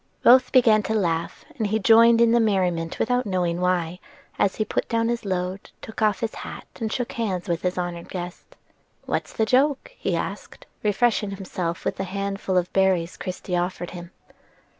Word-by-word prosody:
Both 255 +1 +6
began 230 -5 +5
to 220 - +1
laugh, 170 -5 -1
and 220 - +1
he 215 +2 +1
joined 230 +2 +6
in 230 -1 +5
the 235 - +4
merriment 180 -6 0
without 245 +1 0
knowing 180 -2 -1
why, 180 -1 0 0.4
as 195 - +2
he 215 - -1
put - - -2
down 230 0 +1
his 235 -2 -2
load, 185 0 -3
took 220 - -9
off 210 -2 +2
his 225 -2 -2
hat, - - -8
and 220 -2 -2
shook 245 0 -2
hands 200 -5 -3
with 170 -2 -1
his 180 0 -1
honored 175 -1 -4
guest. 180 -1 -7 0.5
"What's - - -2
the 220 - 0
joke?" 275 - +2
he - - -2
asked, - - -6 0.2
refreshing 210 0 +1
himself 185 -3 -4
with - - -1
the 195 - -2
handful 195 0 -2
of 180 0 0
berries 190 -3 +2
Christie 185 0 -4
offered 175 0 -2
him. 175 -1 -9
195 Hz, 180 wpm, -24 LUFS, 180-225 Hz, 0.5 s, Both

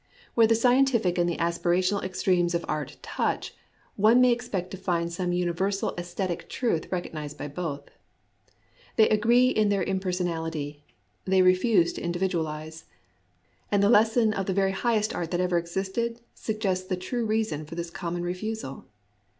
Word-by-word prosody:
Where 230 -1 +5
the 225 - +4
scientific 245 -6 +3
and 175 0 +2
the 170 - -2
aspirational 175 +3 +1
extremes 180 -2 +1
of 170 - -1
art 150 -3 -3
touch, - - -2 0.4
one 220 +4 +5
may 250 -1 +6
expect 220 -7 -2
to 190 - -6
find 170 -2 -1
some 180 0 -1
universal 180 +3 0
sesthetic 175 0 -4
truth 225 -11 -1
recognized 155 -5 -4
by - - -5
both. 145 -1 -4 1.1
They 220 - +6
agree 235 +4 +4
in 215 -4 +2
their 200 -1 +1
impersonality: 165 -6 -2 0.4
they 190 0 +4
refuse 185 0 +4
to - - -7
individualize. 160 -3 -3 0.9
And 200 -1 +3
the 200 - +4
lesson 225 0 +4
of 195 -3 -3
the 190 - 0
very 195 -1 +2
highest 215 +1 0
art 170 -2 -3
that 175 - -1
ever 180 -1 +2
existed 190 +7 -3
sug 215 -1 -5
gests 185 -3 0
the 185 - -1
true 235 +7 -3
reason 215 -9 -1
for 165 - -8
this 170 0 -5
common 175 0 -4
refusal. 180 -4 -4
185 Hz, 160 wpm, -27 LUFS, 170-215 Hz, 1.1 s, may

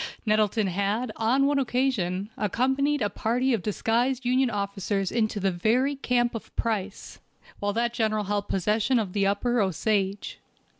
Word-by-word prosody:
Nettleton 215 0 +2
had, 200 +6 -1
on 250 +5 +2
one 285 0 +2
occasion, 230 -7 -1
accompanied 265 +6 0
a 205 - +1
party 245 +5 0
of 225 - 0
disguised 240 +6 0
Union 255 +1 +2
officers 200 -2 -2
into 215 -2 0
the 195 0 +1
very 240 +10 +1
camp 245 -3 0
of 225 - -8
Price, 210 -3 -3 0.4
while 205 0 -1
that 235 +2 0
General 215 -2 0
held 205 0 -2
possession 215 +6 +1
of 205 -5 -2
the 200 -1 +2
upper 235 +4 +1
Osage. 195 +1 -1
220 Hz, 150 wpm, -26 LUFS, 200-245 Hz, 0.4 s, Nettleton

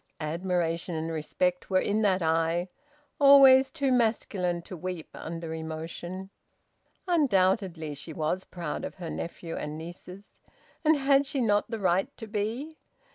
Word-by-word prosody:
Admiration 170 +1 -1
and 160 +1 -3
respect 175 +3 -1
were 185 -1 +3
in 210 +3 0
that 190 -4 +2
eye, 165 +2 +1 0.5
always 270 -2 +8
too 280 -4 -1
masculine 210 -7 +1
to 185 - -8
weep 180 -1 -6
under 165 0 -6
emotion. 165 +4 -6 0.8
Undoubtedly 190 - +2
she 145 +3 -8
was 160 +4 -1
proud 170 -4 -5
of - - -5
her 175 -3 -6
nephew 170 0 -5
and 150 +1 -5
nieces. 180 +4 -11 0.4
And 315 -1 +4
had 275 0 +3
she 280 -1 -2
not 210 -4 +2
the 225 - -3
right 190 +3 +1
to 225 - -7
be? 225 +9 -4
185 Hz, 140 wpm, -28 LUFS, 165-225 Hz, 0.8 s, always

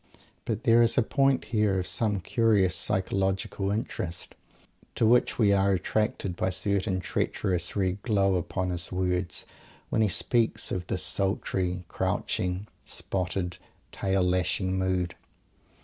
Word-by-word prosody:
But 110 0 -2
there 115 -1 +5
is 115 -1 +3
a 125 - +5
point 135 +2 +2
here 105 -3 +2
of 90 - -1
some 105 0 0
curious 100 -2 +2
psychological 95 +2 0
interest, 95 -5 -3 0.6
to - - +2
which 120 +2 +3
we 105 -4 +4
are 100 0 +3
attracted 95 0 -1
by - - -1
a - - 0
certain 95 +2 0
treacherous 90 -1 -1
red 95 -1 0
glow 100 -4 +2
upon 90 +1 -1
his 90 -2 -2
words 90 -2 -1 0.4
when 110 - +1
he 110 - +3
speaks 115 +3 +1
of 90 -2 -3
this - - 0
sultry, 95 -2 -1
crouching, 90 +2 -2 0.2
spotted, 90 -1 -3 0.3
tail 95 -1 0
lashing 90 +1 0
mood. 95 -2 0
95 Hz, 135 wpm, -27 LUFS, 90-105 Hz, 0.6 s, there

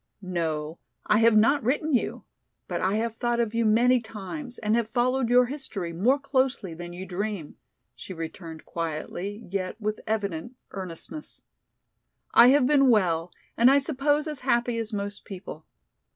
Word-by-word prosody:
"No, 160 -1 -2 0.3
I 215 - +4
have 230 -1 +5
not 275 +7 +4
written 290 +6 0
you, 245 - 0 0.4
but - - -3
I 190 +2 +1
have 225 +1 -1
thought 240 0 0
of 230 -2 0
you 230 0 +1
many 240 +4 +4
times 240 +5 -7
and 215 0 +1
have 235 -2 0
followed 250 +1 +1
your 250 +1 +6
history 235 - -5
more 230 +11 +3
closely 265 - 0
than 175 +1 -8
you 180 +2 -7
dream," 190 -3 -4 0.4
she - - -10
returned 165 -1 -7
quietly, 170 +6 -5
yet 195 +2 -3
with 215 0 -2
evident 210 0 -2 0.2
earnestness. 190 - -7 0.9
"I 235 - +8
have 270 0 +5
been 275 -1 +4
well 175 -6 +2 0.2
and 240 +2 +6
I 275 - +6
suppose 290 +1 +1
as 300 -3 -5
happy 240 -2 +1
as 225 0 -4
most 205 -1 -4
people. 180 -5 -9
220 Hz, 160 wpm, -26 LUFS, 185-255 Hz, 0.9 s, I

